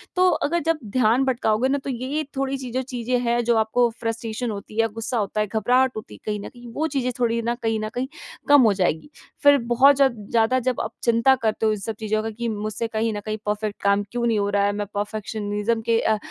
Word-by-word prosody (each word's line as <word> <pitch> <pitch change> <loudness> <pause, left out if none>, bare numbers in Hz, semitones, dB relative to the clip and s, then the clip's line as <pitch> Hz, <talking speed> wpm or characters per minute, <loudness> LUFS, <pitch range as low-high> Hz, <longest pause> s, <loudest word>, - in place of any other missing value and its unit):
तो 365 0 +5 0.2
अगर 340 +3 0
जब 330 -1 +2 0.2
ध्यान 250 +1 +3
भटकाओगे 240 -2 +1
ना 280 - +2
तो - - -4
ये-ये 265 +5 -2
थोड़ी-सी 270 -1 -2
जो 255 +2 -1
चीज़ें 250 -1 -2
हैं 240 0 +1
जो 235 0 +3
आपको 230 +2 +2
फ्रस्ट्रेशन 225 +1 -3
होती 210 +2 -7
है, 225 - +4
गुस्सा 225 +2 -3
होता 215 0 -1
है, 210 - 0
घबराहट 245 +5 +2
होती 215 - -8
है - - -16
कहीं 210 -1 -2
न - - -6
कहीं 240 -1 -13
वो 315 +5 0
चीज़ें 250 -2 0
थोड़ी 235 -1 +1
ना 235 +1 -1
कहीं 225 -1 0
न 215 0 -3
कहीं 250 +2 -1 0.4
कम 285 -1 +7
हो 220 -4 +5
जाएगी। 180 - -1 0.3
फिर 285 0 +7
बहुत 250 +4 +5
जब 270 -3 +3 0.2
ज़्यादा 230 +3 +3
जब 255 0 -1
आप 220 - -4
चिंता 235 +3 +4
करते 220 -3 -1
हो 215 - +4
इन 215 - -1
सब 220 +3 -4
चीज़ों 215 0 0
का 225 - -2
कि 235 +2 -4
मुझसे 215 +1 -3
कहीं 225 0 -1
न 205 - -3
कहीं 215 0 -2
परफ़ेक्ट 210 0 -2
काम 200 0 +3
क्यों 240 0 -1
नहीं 225 -3 +2
हो 200 0 0
रहा 200 - +3
है, 205 - +2
मैं 205 0 -3
परफेक्शनिज़्म 210 +1 -2
के 230 0 +2
अ, 220 -1 +2
230 Hz, 240 wpm, -23 LUFS, 215-255 Hz, 0.4 s, कम